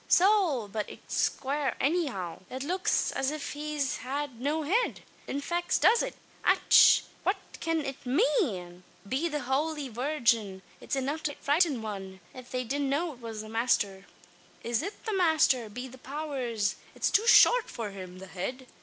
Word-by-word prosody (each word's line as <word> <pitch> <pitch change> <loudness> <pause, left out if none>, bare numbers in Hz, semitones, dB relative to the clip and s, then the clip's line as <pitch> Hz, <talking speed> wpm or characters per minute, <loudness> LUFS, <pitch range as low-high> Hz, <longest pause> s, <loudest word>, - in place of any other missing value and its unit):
"Sowl! 360 - +4
but 210 +1 -4
it's - - -1
quare 280 +1 -2
anyhow. 270 - -1
It 260 +1 -5
looks 365 +5 +1
as 270 0 0
if 300 -1 -4
he 300 +1 -5 0.2
had 270 -2 -4
no 300 +4 0
head. 425 +11 0 0.3
In 280 - -3
faix 345 +4 0
does 460 +1 +5
it! - - -3 0.3
Ach! - - +6 0.2
what 385 +2 +1 0.3
cyan 325 -2 0
it 275 -1 -6
mane? 245 - 0 0.3
Be 270 +9 0
the 295 -1 -2
Howly 285 +2 -1
Virgin! 230 -6 0 0.2
it's - - -3
enough 275 +4 -2
to 290 -2 -2
frighten 290 -5 +1
wan, 195 -3 -6
av 255 -1 -11
they 255 0 -2
didn't 275 +3 -1
know 310 +4 0
it 245 - -17
was 225 -2 -6
the 215 - -10
masther! 205 -4 0 0.6
"Is 235 -1 0
it 405 - -7
the 440 - -1
masther? 315 - +3
Be 250 +5 -6
the 260 +1 -13
powers, 260 -7 -2 0.2
it's - - 0
too 440 +3 +3
short - - +7
for 220 -3 -5
him! 185 -2 -9
The 190 - -9
head? 195 +8 -5
270 Hz, 170 wpm, -29 LUFS, 225-310 Hz, 0.6 s, short